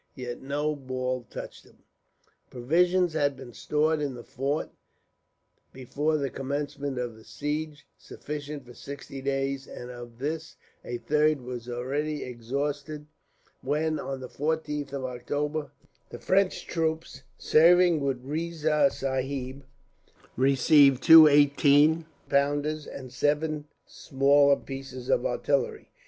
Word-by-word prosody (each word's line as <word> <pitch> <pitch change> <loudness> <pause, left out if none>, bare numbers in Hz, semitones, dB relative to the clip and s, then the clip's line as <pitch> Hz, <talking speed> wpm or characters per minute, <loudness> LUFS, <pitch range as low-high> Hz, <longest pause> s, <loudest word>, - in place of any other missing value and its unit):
Yet 125 -2 -6
no 145 +3 -1
ball 130 -2 -4
touched - - -8
him. - - -23 0.7
Provisions 175 +7 +2
had 145 -3 0
been 130 -2 -11
stored 155 +6 0
in 140 -3 -2
the 120 - -9
fort, 140 +4 -3 1.0
before 145 +4 -1
the 140 -2 -2
commencement 140 0 -4
of 120 -2 -3
the 110 - -16
siege, 150 +2 -4
sufficient 145 -2 -7
for 120 - -13
sixty 140 +1 -9
days; 135 0 -2
and 125 0 -8
of 120 -1 -10
this 155 +5 -4 0.3
a 120 - -4
third 150 +4 +1
was 125 -1 -7
already 140 +5 -2
exhausted 140 +5 -4 0.6
when, 155 +3 -1
on 135 -1 -5
the 130 - -6
14th 150 0 -3
of 140 -2 -4
October, 145 +4 -3 0.4
the - - -8
French 190 0 +1
troops 160 -4 -2 0.2
serving 175 +1 +5
with 135 -3 -2
Riza 155 -1 +1
Sahib 135 0 -3 0.7
received 135 0 +4
two 160 -1 +10
eighteen 145 +2 +4 0.2
pounders, 145 +2 0
and 130 -2 -9
seven 150 +2 0 0.2
smaller 140 +1 +3
pieces 135 -2 -8
of - - +2
artillery. 450 -3 -1
145 Hz, 120 wpm, -27 LUFS, 130-155 Hz, 1.0 s, two